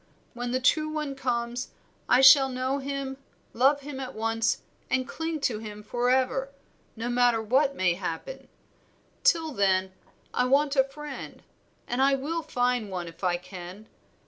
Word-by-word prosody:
When 245 0 -4
the 255 +1 0
true 305 +4 +2
one 305 -2 -3
comes 245 -2 -2 0.4
I 250 - +6
shall 270 0 +8
know 260 +2 -1
him, 275 -1 -4 0.4
love 275 +4 +3
him 280 -1 -7
at 260 -1 -6
once, 225 +1 0 0.3
and 255 0 0
cling 320 0 -4
to 230 -6 0
him 210 -1 -8
forever, 255 +3 +1 0.5
no 230 +1 -4
matter 245 -1 +3
what 270 +6 +2
may 185 -5 +2
happen. 180 - -6 0.8
Till 330 -10 +3
then 190 -5 +1 0.4
I 250 - +2
want 280 +2 +2
a 265 - +5
friend, 295 +2 -9 0.4
and 245 +2 -1
I 275 0 +4
will 310 +5 -3
find 245 -7 0
one 180 -2 -4
if 165 +3 -13
I 175 -1 +2
can. 180 +3 -10
255 Hz, 155 wpm, -27 LUFS, 225-275 Hz, 0.8 s, shall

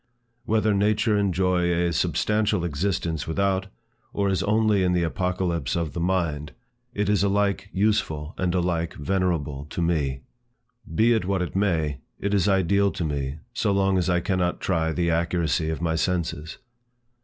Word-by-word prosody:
Whether 110 -1 +2
nature 105 +2 +2
enjoy 90 -3 +1
a 85 0 +1
substantial 105 +1 +1
existence 80 -2 -2
without, 95 +2 0 0.5
or 100 -1 +1
is 95 -2 +1
only 105 -1 +2
in 90 -1 +2
the 90 -1 +2
apocalypse 90 -4 -1
of 85 -5 -2
the - - -4
mind, 85 -4 -1 0.4
it 105 -3 -1
is 105 -3 +2
alike 100 0 +1
useful 90 -7 0
and 90 -1 -1
alike 85 -2 -1
venerable 75 -5 -1
to 75 - -7
me. 75 -6 0 0.7
Be 115 +2 +4
it 110 -5 0
what 95 -1 0
it 90 - -6
may, 80 -8 0 0.2
it 100 0 -1
is 100 -2 +2
ideal 100 +1 +3
to 90 -4 -3
me, 70 -1 -3 0.2
so 115 -3 0
long 95 -1 +2
as 90 - 0
I 90 0 +2
cannot 90 -1 0
try 80 -3 0
the 85 +1 0
accuracy 85 -1 0
of 80 0 -3
my 80 -1 +1
senses. 80 -2 -2
90 Hz, 160 wpm, -25 LUFS, 80-100 Hz, 0.7 s, Be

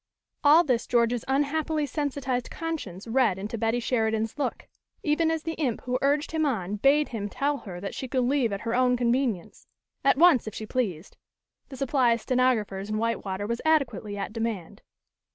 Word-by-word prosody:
All 305 +4 +7
this 250 -6 0
George's 235 -1 +2
unhappily 295 +3 0
sensitized 270 -4 -2
conscience 300 - -5
read 230 -5 +2
into 205 +4 -5
Betty 225 +1 0
Sheridan's 220 -2 0
look, 285 - -3 0.4
even 320 +2 +2
as 320 -1 -1
the 325 - -3
imp 250 -6 0
who 250 0 -2
urged 290 +2 +1
him 320 -1 0
on 210 -8 -1
bade 285 +6 +3
him 205 -3 -4
tell 285 +6 -1
her 180 -5 -8
that 195 +2 -5
she 260 - -5
could 255 +1 0
leave 250 -3 +1
at 200 - -3
her 230 0 -2
own 250 0 +3
convenience; 240 -5 -1 0.4
at 275 0 +4
once, 320 -8 +5
if 215 - -6
she 220 - -5
pleased; 205 -8 -3 0.5
the 265 - -9
supply 260 -3 +2
of 230 - -3
stenographers 220 -7 0
in 215 - -1
Whitewater 205 -3 -2
was 235 +2 -3
adequately 275 -10 +1
at 200 +1 -4
demand. 225 -7 -4
245 Hz, 180 wpm, -27 LUFS, 220-280 Hz, 0.5 s, All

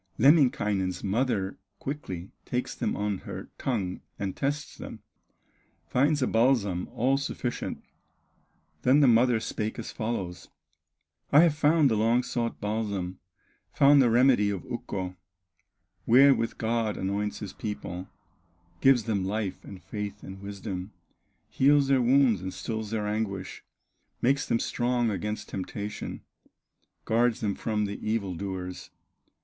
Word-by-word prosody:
Lemminkainen's 105 - +3
mother 100 -2 0 0.2
quickly 95 - -6
Takes - - -2
them - - -2
on 105 -2 -1
her - - -8
tongue 100 -9 -2 0.2
and 95 -2 -3
tests 145 +2 -2
them, - - -9 0.8
Finds 145 +2 +2
a - - +2
balsam 115 -7 +2
all 135 +4 +1
sufficient. 125 -3 -4 1.0
Then 135 +4 +5
the 140 - +6
mother 120 0 +4
spake 110 0 -3
as 115 - -5
follows: 95 -6 -4 0.8
"I 145 - +8
have 170 -3 +5
found 150 0 +4
the - - +3
long 115 +3 +3
sought 115 -2 -2
balsam, 100 -4 -2 0.5
Found 140 0 +6
the 125 - +4
remedy 120 -3 +4
of 95 -6 -4
Ukko, 90 -1 -5 0.9
Wherewith 130 -1 +5
God 115 -1 0
anoints 100 +2 -2
his 100 -2 -7
people, 95 -4 -5 0.7
Gives 135 -4 +5
them 105 -4 -1
life, 100 0 -3
and 95 -3 -11
faith, 105 +1 -6
and 95 0 -9
wisdom, 100 -1 -6 0.5
Heals 140 0 +3
their 135 -2 +4
wounds 125 -5 +4
and 95 0 -4
stills 110 0 -4
their 110 -1 -2
anguish, 105 -3 -3 0.6
Makes 135 +3 +2
them 115 - +2
strong 120 -1 0
against 105 +2 -4
temptation, 100 +2 -5 0.8
Guards 115 +1 +2
them 105 -2 0
from 105 0 -1
the 100 0 -5
evil 105 -4 -1
doers." 90 0 -5
110 Hz, 130 wpm, -28 LUFS, 100-125 Hz, 1.0 s, I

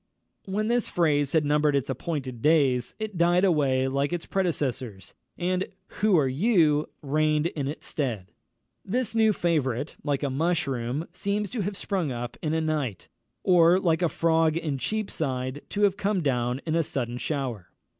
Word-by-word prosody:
When 210 +3 -1
this 240 0 +1
phrase 145 -5 +1
had 160 -2 +3
numbered 150 0 +2
its 140 - 0
appointed 135 -3 -4
days, 135 -5 +2
it 215 -5 -5
died 175 +2 +4
away 135 -7 +2
like 140 +2 0
its 175 -1 -3
predecessors, 130 - -2 0.2
and 185 +1 -1 0.3
"Who 210 -3 +4
are 145 -4 +3
you?" 155 - +2
reigned 155 +2 +1
in 145 -5 -2
its 150 - -6
stead. 115 -11 -3 0.5
This 235 +2 -1
new 220 -1 +4
favourite, 150 - -1
like 145 -1 -1
a 140 - 0
mushroom, 140 -3 -1
seems 200 +2 -2
to 235 - -2
have 200 0 -3
sprung 185 -9 -1
up 120 0 -5
in 155 0 -1
a 160 - +1
night, 150 - -2 0.3
or, 175 0 +5
like 170 -3 +1
a 175 - +2
frog 165 -1 +2
in 150 -5 -2
Cheapside, 140 -10 -2
to 205 - -1
have 200 -1 +3
come 205 -2 0
down 125 -1 0
in 160 - -1
a 165 - +3
sudden 125 -5 -3
shower. 130 - -3
155 Hz, 165 wpm, -26 LUFS, 135-180 Hz, 0.5 s, or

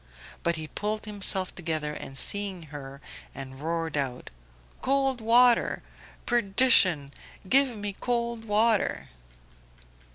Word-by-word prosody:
But 170 0 0
he 155 -1 -6
pulled 210 +5 -3
himself 195 -3 -2
together 155 -3 -3
on 135 - -8
seeing 195 +2 0
her, 140 -1 -9 0.3
and 135 -1 -8
roared 165 0 -2
out 135 -4 -3 0.5
"Cold 270 -2 +1
water! 240 +2 +4 0.4
Perdition! 195 - +4 0.4
Give 265 0 +4
me 205 -1 -4
cold 235 +1 -2
water." 215 0 +1
200 Hz, 105 wpm, -27 LUFS, 155-235 Hz, 0.5 s, water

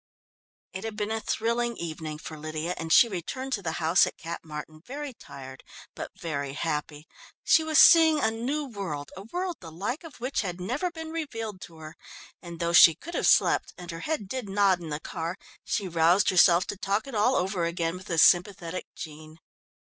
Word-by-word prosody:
It 190 - -6
had 225 -1 -5
been 210 0 -2
a 225 - -1
thrilling 235 +2 -1
evening 160 -2 -5
for 155 +1 -8
Lydia, 155 +3 -4
and 165 0 -6
she 205 +8 +7
returned 255 +8 -5
to 205 - -1
the 160 -4 -3
house 165 +2 +3
at - - -7
Cap 170 +1 -7
Martin 155 0 -8
very 280 +3 -6
tired, 130 - -11 0.3
but - - -6
very 140 -4 -4
happy. 150 0 -4 0.4
She 320 - +4
was 315 -1 0
seeing 320 -2 +8
a 220 -5 +2
new 265 +7 -2
world, 185 - -6
a 190 - -8
world 350 - -4
the 165 -3 -10
like 210 - -4
of 325 -5 -12
which 255 +4 -1
had 180 -4 -5
never 255 - -2
been 320 -2 -8
revealed 225 - -5
to 165 - -16
her, 155 0 -10 0.5
and 170 -1 -9
though 170 0 -1
she 165 -2 +9
could 340 - -10
have - - 0
slept, - - +3
and 175 -1 -8
her 165 - -7
head 220 - -3
did 245 -1 -5
nod 195 -2 +3
in 165 -2 -8
the 150 0 -3
car, 170 +3 -5 0.3
she 200 -4 -2
roused 170 +3 +3
herself 175 -1 +5
to 205 - -5
talk 200 +2 -1
it 275 - -9
all 220 +5 +2
over 185 -1 0
again 170 0 -2
with 185 +1 -10
the 165 - -2
sympathetic 180 0 +3
Jean. 155 0 -10
185 Hz, 200 wpm, -27 LUFS, 165-235 Hz, 0.5 s, she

